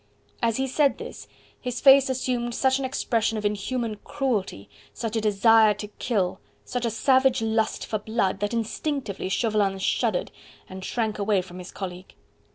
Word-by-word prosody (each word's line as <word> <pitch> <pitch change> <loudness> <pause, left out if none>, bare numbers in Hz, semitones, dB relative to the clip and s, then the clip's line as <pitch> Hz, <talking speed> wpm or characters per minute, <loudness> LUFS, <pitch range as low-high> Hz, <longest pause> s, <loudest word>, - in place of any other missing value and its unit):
As 230 -1 +1
he 265 - 0
said 275 +2 +2
this - - -9 0.3
his 250 -1 -3
face 275 -1 +7
assumed 245 -2 -1
such 265 0 +2
an 270 - -2
expression 230 -4 0
of 210 - -4
inhuman 215 +2 -2
cruelty, 215 - -2 0.3
such 225 -1 -3
a 225 - +1
desire 215 +1 +5
to 205 +1 -7
kill, 195 -7 0 0.3
such 245 -1 -3
a - - +1
savage 260 +2 +3
lust 220 0 0
for 215 - -2
blood, 210 -3 -1
that 205 0 -1
instinctively 230 -2 -3
Chauvelin 205 -2 +1
shuddered 195 +1 0 0.4
and 185 0 -9
shrank 220 0 -2
away 200 -1 +2
from 180 0 -11
his 180 - -9
colleague. 185 -1 -7
225 Hz, 165 wpm, -25 LUFS, 205-250 Hz, 0.4 s, face